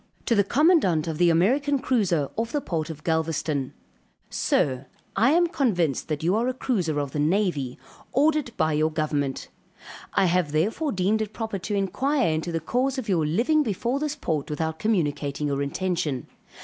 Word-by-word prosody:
To - - +2
the 205 -2 +4
commandant 200 - +3
of 160 -2 -3
the 175 -1 +5
American 265 - +2
cruiser, 195 - 0
off 230 +1 -2
the 295 - 0
port 165 - -3
of 155 -2 -8
Galvezton. 160 -4 -1 0.6
Sir 130 -1 0 0.3
I 225 +7 +4
am 345 +1 +4
convinced 180 - 0
that 155 -1 -3
you 180 +4 +2
are 230 +3 +1
a 255 - -1
cruiser 180 - -1
of 140 -2 -3
the 150 - -3
navy, 150 -6 0 0.3
ordered 295 0 +2
by 155 - +2
your 155 +1 +2
government. 150 -3 -2 0.7
I - - +4
have 175 -4 +1
therefore 220 - 0
deemed 200 +4 +1
it 215 -1 -4
proper 220 -4 -4
to 205 +3 -3
inquire 260 - +1
into 160 +2 -2
the 165 - -1
cause 255 - -1
of 245 -4 -4
your 165 -5 +2
living 245 - +2
before 240 +2 -1
this 300 0 -2
port 160 - -2
without 160 +1 -3
communicating 150 -8 0
your 140 -1 -1
intention. 145 -3 -2
180 Hz, 175 wpm, -25 LUFS, 155-240 Hz, 0.7 s, the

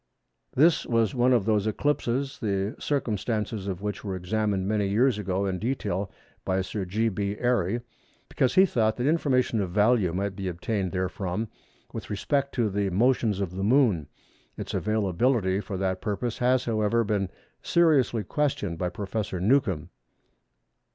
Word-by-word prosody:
This 160 +5 +4
was 115 -4 +2
one 125 0 +3
of 120 -6 +3
those 110 -1 +2
eclipses, 135 +2 -1
the 100 +2 -1
circumstances 110 -6 -2
of 95 0 -4
which 105 -1 -3
were 100 -3 -3
examined 95 +1 -1
many 105 -1 +1
years 110 +3 +2
ago 100 0 -1
in 95 -2 -2
detail 105 -4 -2 0.3
by 95 0 0
Sir 95 +1 -4
G. 110 +5 0
B. 100 0 -2
Airy, 120 -3 +1 0.5
because 130 - 0
he 190 - +7
thought 110 - +1
that 125 - -1
information 130 -7 +2
of 95 - -2
value 105 0 +3
might 95 +2 -2
be 95 -1 -4
obtained 95 +2 -2
therefrom 95 +3 -2 0.4
with - - -6
respect 140 +7 -1
to 115 -5 +1
the 100 0 0
motions 110 0 +2
of 95 -3 -2
the 95 - -3
Moon. 105 - +3 0.5
Its - - -5
availability 105 -1 +1
for 100 -2 -5
that 95 0 -1
purpose 110 +2 -3
has, 125 0 +2
however, 115 0 +1
been 100 -3 -1 0.3
seriously 145 -10 +3
questioned 100 - -1
by 90 - 0
Professor 100 0 -4
Newcomb. 95 - +1
105 Hz, 155 wpm, -26 LUFS, 95-120 Hz, 0.5 s, he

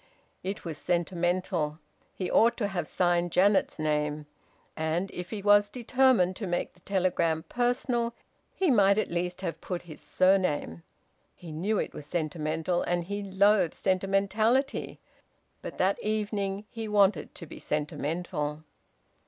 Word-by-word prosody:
It 195 +1 -5
was 160 -3 -5
sentimental. 175 -3 0 0.4
He 185 -2 -3
ought 230 +1 +4
to 205 -4 -1
have 175 -5 -3
signed 175 -1 +1
Janet's 195 +3 +3
name. 150 -1 -1 0.5
And, 160 +4 -1
if 180 -1 -6
he 210 -3 -5
was 205 0 +5
determined 245 -5 +3
to 205 - -4
make 175 0 -2
the 180 - -22
telegram 175 -4 0
personal, 240 -1 0 0.4
he 370 -6 +2
might 200 -3 +5
at 215 - 0
least 175 +1 -2
have 170 -3 -4
put 180 -2 -4
his 160 -3 -11
surname. 150 - +1 0.5
He 170 -3 -10
knew 190 +8 -1
it - - -2
was 145 - -9
sentimental, 160 +1 -1
and 175 0 0
he 200 +4 -4
loathed 195 -2 +3
sentimentality. 200 +8 +1 0.6
But - - -7
that 190 +2 +1
evening 210 -2 -2
he 225 -1 -5
wanted 200 -6 +2
to - - -8
be - - -11
sentimental. 150 0 -3
185 Hz, 140 wpm, -28 LUFS, 165-205 Hz, 0.6 s, was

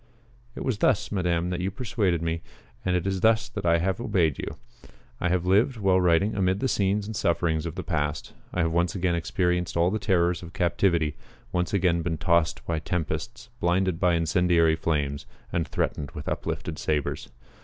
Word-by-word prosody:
It - - -5
was 120 -6 -1
thus, 125 -6 +2
Madame, 90 -3 0
that 90 - -2
you 90 +2 -1
persuaded 100 -6 -1
me, 80 0 -1 0.4
and 90 -1 +1
it 90 0 0
is 95 -1 -1
thus 110 +1 +3
that 100 -6 -4
I 85 0 +5
have 95 +6 -1
obeyed 85 - +1
you. - - -5 0.6
I 90 - 0
have 90 0 +1
lived, 105 +7 +3
while 95 -3 +3
writing, 90 +4 +3
amid 95 0 +1
the 130 - 0
scenes 100 -3 +1
and 110 +1 -6
sufferings 85 -3 0
of 80 - -6
the 95 - -4
past. 75 -3 -2 0.2
I 90 - 0
have 80 - 0
once 85 +4 +1
again 90 -2 +1
experienced 90 0 0
all 85 +2 +3
the 110 - -1
terrors 90 -3 +1
of 85 -1 -10
captivity 85 -4 +1 0.3
once 90 -1 0
again 90 -4 +2
been 80 -1 -2
tossed 85 -1 +1
by 80 -2 -1
tempests, 80 0 -4
blinded 90 0 +1
by 90 -2 +3
incendiary 85 0 +3
flames, 75 -3 -1 0.3
and 85 -1 0
threatened 70 -2 -2
with - - -7
uplifted 80 -2 -3
sabres. 75 -3 -2
90 Hz, 185 wpm, -26 LUFS, 85-95 Hz, 0.6 s, I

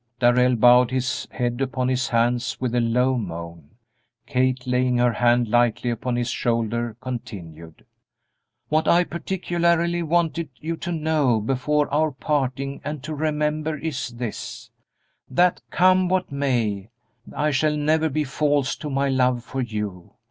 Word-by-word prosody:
Darrell 125 +1 +4
bowed 125 +1 +6
his 130 0 -2
head 120 0 -2
upon 130 -1 -1
his 130 0 0
hands 120 +1 0
with 125 -2 -2
a 120 - +2
low 125 +2 +2
moan. 85 -5 -7 0.6
Kate, 130 -1 0
laying 125 0 +1
her 120 -1 +3
hand 120 +1 +3
lightly 120 +1 +2
upon 120 +2 -2
his 120 0 -1
shoulder, 115 -1 -1
continued: 85 -10 -8 0.8
"What 155 +1 +1
I 175 +1 +5
particularly 170 -1 0
wanted 170 -1 0
you 165 +2 -3
to 175 - -5
know 155 -7 +1
before 135 +6 0
our 155 +2 +3
parting 140 -1 -2
and 150 -2 -5
to 155 +2 -5
remember 150 0 -1
is 145 -5 -3
this: 120 -2 -7 0.6
that 180 0 +2
come 185 0 +3
what 185 -3 0
may, 115 -8 -1 0.5
I 150 +1 +1
shall 150 +2 +1
never 155 +2 +2
be 155 +2 0
false 145 -1 0
to 150 - -6
my 140 0 0
love 125 -2 +1
for 135 +1 -4
you. 105 -6 -5
130 Hz, 145 wpm, -23 LUFS, 120-150 Hz, 0.8 s, bowed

